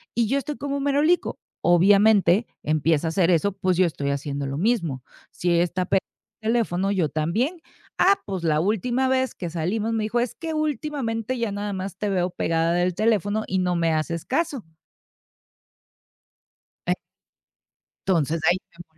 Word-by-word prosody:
y 235 -2 +2
yo 270 +5 +1
estoy 295 +1 -5
como 280 0 -3
un 275 - -3
merolico. 290 +5 +2 0.2
Obviamente 195 +3 +5 0.2
empieza 155 +1 +1
a - - +1
hacer 170 +1 +2
eso, 180 +3 +3
pues 185 -2 0
yo 185 - +5
estoy 145 -4 -2
haciendo 140 0 -3
lo 135 +1 -3
mismo. 170 - 0 0.3
Si 175 - -1
ella 170 0 +4
está 180 +1 -2
pe 195 +1 +2 0.4
teléfono 215 -4 0
yo 180 -7 +1
también, 225 - -1 0.4
ah, 390 +2 +4
pues 190 -4 -4
la 155 -2 +2
última 230 +8 +1
vez 260 0 +1
que 175 - -5
salimos 200 +7 -1
me 220 -1 0
dijo: 225 +3 0
"Es 240 -1 -2
que 325 -1 -5
últimamente 265 -5 -2
ya 230 -3 -1
nada 205 0 -3
más 190 -1 -5
te 210 0 -2
veo 180 -2 +1
pegada 165 -1 0
del 175 +1 +1
teléfono 215 +1 +1
y 190 - -1
no 180 -1 +1
me 165 -1 +1
haces 160 +1 -2
caso". 280 -4 -1 2.3
E - - +4 1.1
entonces 165 -3 +1
ahí 175 - +4
me 175 0 -13
195 Hz, 170 wpm, -24 LUFS, 170-235 Hz, 2.3 s, Obviamente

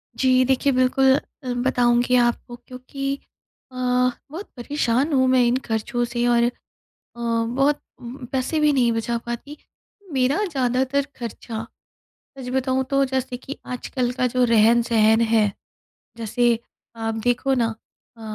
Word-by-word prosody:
जी, 255 -1 +3
देखिए 270 +2 +2
बिल्कुल 260 +1 +4 0.3
अ, 250 -1 -2
बताऊँगी 245 0 +2
आपको 240 0 +1
क्योंकि 275 +2 -4 0.6
अ, - - -15 0.6
बहुत 365 +6 -7
परेशान 265 +2 0
हूँ 260 -1 +3
मैं 255 -1 +4
इन 240 +1 +2
खर्चों 225 +2 -1
से 240 0 -2
और 235 -1 +3
अ, 240 - +2 0.7
बहुत 235 +5 0 0.2
उम, 245 +2 -9
पैसे 265 +4 -1
भी 300 -1 +4
नहीं 245 -4 +3
बचा 230 +1 -1
पाती। 240 +5 -6 0.6
मेरा 270 +9 +2
ज़्यादातर 265 -2 0
खर्चा 230 -1 -6 0.7
सच 255 -2 -7
बताऊँ 265 0 +1
तो 275 0 +3
जैसे 260 -1 -2
कि 270 +3 -8
आजकल 250 0 -3
का 255 0 0
जो 250 +1 +1
रहन-सहन 230 -1 +4
है, 220 -3 +2 0.7
जैसे 235 +1 +1 0.4
आप 225 -1 -3
देखो 245 +2 +1
ना 240 -3 +2 0.5
अ, - - -14
250 Hz, 135 wpm, -22 LUFS, 235-265 Hz, 0.7 s, बिल्कुल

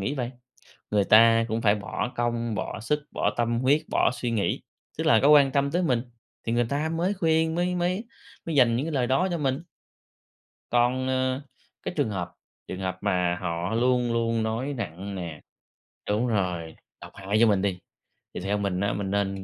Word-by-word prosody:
nghĩ 135 +9 -2
vầy, 125 -3 -3 0.6
người 105 -1 +3
ta 115 +2 +6
cũng 115 0 -2
phải 105 -2 +4
bỏ 105 +4 -4
công, 120 -1 -1
bỏ 105 - -4
sức, 130 +8 0
bỏ - - 0
tâm 120 0 +1
huyết, 140 +4 +3
bỏ - - +3
suy 120 -1 -3
nghĩ, 110 -3 0 0.4
tức - - -1
là 115 - +6
có 140 - +5
quan 145 -2 +7
tâm 140 +1 +1
tới 175 +2 +1
mình, 125 -8 +1 0.4
thì 115 - -1
người 120 0 +2
ta 145 +3 -1
mới 170 +4 0
khuyên, 160 -3 +1
mới 180 +1 0
mới 180 +5 -1 0.4
mới 165 - -3
dành 120 -4 +5
những 130 +6 -1
cái 165 - -3
lời 130 -3 +1
đó 135 +9 +2
cho 170 - -1
mình. 135 -1 -1 1.1
Còn, 125 +2 +2
ờ, 130 0 0 0.4
cái - - -3
trường 140 -6 +1
hợp 90 -4 -4 0.3
trường 95 - -6
hợp 95 -1 -3
mà 90 -1 +1
họ 90 +4 -2
luôn 125 0 +2
luôn 115 -1 0
nói 115 +6 -2
nặng 100 - -5
nè 85 -4 -6 0.7
đúng 110 +4 +1
rồi, 90 -7 -2 0.3
độc - - -10
hại 100 +2 -1
vô 115 - +7
mình 100 -3 +3
đi, 95 -2 -1 0.5
thì - - -5
theo 100 +3 -1
mình 100 -3 -1
á 100 +1 0
mình 100 -1 -3
nên 100 -1 -1
115 Hz, 200 wpm, -26 LUFS, 100-135 Hz, 1.1 s, quan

